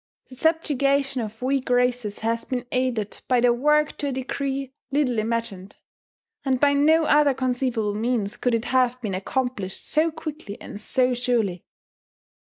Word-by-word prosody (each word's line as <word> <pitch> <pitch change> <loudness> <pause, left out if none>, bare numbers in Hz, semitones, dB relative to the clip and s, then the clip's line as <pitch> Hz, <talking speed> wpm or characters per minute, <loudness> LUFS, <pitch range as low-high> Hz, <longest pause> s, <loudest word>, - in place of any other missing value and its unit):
The 255 - -11
subjugation 275 -3 +1
of 220 +2 -7
weak 265 0 0
races 245 -4 +1
has 230 0 0
been 250 -2 -3
aided 250 -5 -1
by 250 -1 +3
their 240 0 +4
work 300 +4 +2
to 290 - -1
a - - -1
degree 270 +1 -3 0.2
little 265 -5 +1
imagined; 215 -4 -3 0.7
and 265 -2 +1
by 285 +1 +4
no 310 +3 +4
other 295 -2 +4
conceivable 250 -4 -1
means 220 -1 -1
could 245 -2 +1
it 230 - -2
have 255 -1 +2
been 210 -5 -3
accomplished 200 0 -3
so 315 +2 +2
quickly 305 -9 -7
and - - -8
so 250 +3 +2
surely. 235 -8 0
250 Hz, 155 wpm, -24 LUFS, 230-275 Hz, 0.7 s, their